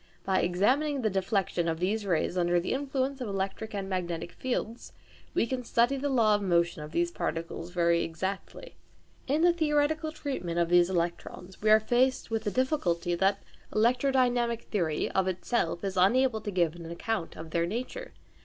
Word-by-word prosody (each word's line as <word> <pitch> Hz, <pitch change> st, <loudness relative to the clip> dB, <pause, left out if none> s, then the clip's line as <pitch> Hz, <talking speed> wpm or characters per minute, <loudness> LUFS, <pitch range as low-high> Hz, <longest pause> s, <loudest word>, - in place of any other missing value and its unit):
By 190 Hz, -1 st, +2 dB
examining 255 Hz, -, +1 dB
the 215 Hz, -, +1 dB
deflection 190 Hz, -2 st, 0 dB
of 165 Hz, -1 st, -1 dB
these 205 Hz, +3 st, -1 dB
rays 175 Hz, 0 st, 0 dB
under 175 Hz, -1 st, +2 dB
the 170 Hz, -, -2 dB
influence 270 Hz, 0 st, -2 dB
of 245 Hz, -, -3 dB
electric 195 Hz, +2 st, -3 dB
and 195 Hz, -1 st, -3 dB
magnetic 175 Hz, -3 st, -3 dB
fields, 240 Hz, -1 st, -4 dB, 0.4 s
we -, -, +3 dB
can 250 Hz, +1 st, -3 dB
study 240 Hz, +3 st, +2 dB
the 280 Hz, +1 st, -2 dB
law 230 Hz, -5 st, +4 dB
of 205 Hz, -, +1 dB
motion 170 Hz, -3 st, +1 dB
of 150 Hz, 0 st, -8 dB
these 170 Hz, +1 st, 0 dB
particles 165 Hz, 0 st, -4 dB
very 170 Hz, -1 st, +2 dB
exactly. 190 Hz, -, -5 dB, 0.5 s
In 295 Hz, +4 st, +1 dB
the 350 Hz, 0 st, +6 dB
theoretical 310 Hz, 0 st, +1 dB
treatment 265 Hz, -, -4 dB
of 170 Hz, -1 st, +2 dB
these 175 Hz, 0 st, +5 dB
electrons, 180 Hz, +1 st, -3 dB
we 215 Hz, -, +2 dB
are 215 Hz, 0 st, +8 dB
faced 245 Hz, +2 st, +1 dB
with 225 Hz, 0 st, -1 dB
the -, -, +2 dB
difficulty 190 Hz, -, 0 dB
that 195 Hz, +3 st, +1 dB, 0.3 s
electrodynamic 245 Hz, 0 st, +2 dB
theory 170 Hz, -7 st, -1 dB
of 190 Hz, -1 st, +1 dB
itself 185 Hz, -1 st, -1 dB
is 195 Hz, -1 st, -2 dB
unable 220 Hz, +5 st, +3 dB
to 210 Hz, -, -4 dB
give 175 Hz, -4 st, +1 dB
an 170 Hz, -1 st, -9 dB
account 170 Hz, +2 st, -3 dB
of 160 Hz, 0 st, -8 dB
their 170 Hz, 0 st, +1 dB
nature. 255 Hz, -, -5 dB
200 Hz, 175 wpm, -29 LUFS, 175-255 Hz, 0.5 s, are